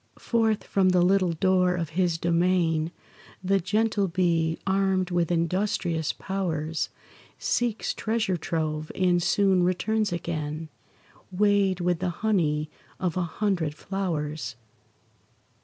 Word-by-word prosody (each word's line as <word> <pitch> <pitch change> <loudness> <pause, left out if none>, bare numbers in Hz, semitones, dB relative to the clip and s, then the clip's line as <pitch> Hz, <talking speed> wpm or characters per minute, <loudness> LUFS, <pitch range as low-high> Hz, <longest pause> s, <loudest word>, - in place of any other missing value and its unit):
Forth 225 -3 +1
from 190 -2 +2
the 180 -1 +4
little 185 -1 +3
door 180 +1 +2
of 165 -3 -3
his 170 0 +1
domain 170 -1 +1 0.5
The 195 +1 +2
gentle 210 +2 +1
bee, 170 -2 +1
armed 190 -1 +1
with 175 -1 +1
industrious 170 -1 0
powers, 165 -5 -2 0.5
Seeks 240 -3 -1
treasure 220 -4 -1
trove, 155 -2 -2
and 180 -2 +2
soon 190 0 +3
returns 205 +4 +1
again, 160 -2 -4 0.6
Weighed 195 -1 +2
with 175 -1 +1
the 180 - -1 0.2
honey 155 -8 +1 0.3
of 180 -3 -1
a 185 - 0
hundred 175 -3 -1
flowers. 160 -8 -3
180 Hz, 115 wpm, -26 LUFS, 165-195 Hz, 0.6 s, the